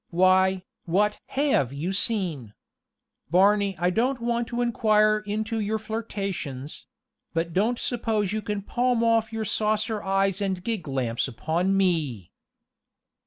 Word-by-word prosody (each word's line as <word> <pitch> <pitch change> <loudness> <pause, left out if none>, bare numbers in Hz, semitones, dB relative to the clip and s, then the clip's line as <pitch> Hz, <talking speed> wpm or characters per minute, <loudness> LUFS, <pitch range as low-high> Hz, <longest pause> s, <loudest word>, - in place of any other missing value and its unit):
Why, 185 +1 +3 0.2
what 210 +5 +1
have 265 - +1
you 155 +7 -3
seen? 180 - -1 0.7
Barney, 200 +3 +3
I 180 +1 +1
don't 250 +6 +1
want 235 0 -1
to 240 0 -2
inquire 215 -2 +3
into 220 +2 -2
your 215 +1 -1
flirtations; 200 - -5 0.5
but 165 0 -1
don't 220 +7 +1
suppose 220 -5 -1
you 215 - -1
can 210 -1 -3
palm 245 +1 +1
off 230 -1 +2
your 225 -1 -3
saucer 215 +1 0
eyes 195 0 0
and 190 -2 -2
gig 215 -7 -3
lamps 130 -4 -1
upon 170 +9 0
me!" 150 - 0
200 Hz, 130 wpm, -25 LUFS, 175-220 Hz, 0.7 s, Why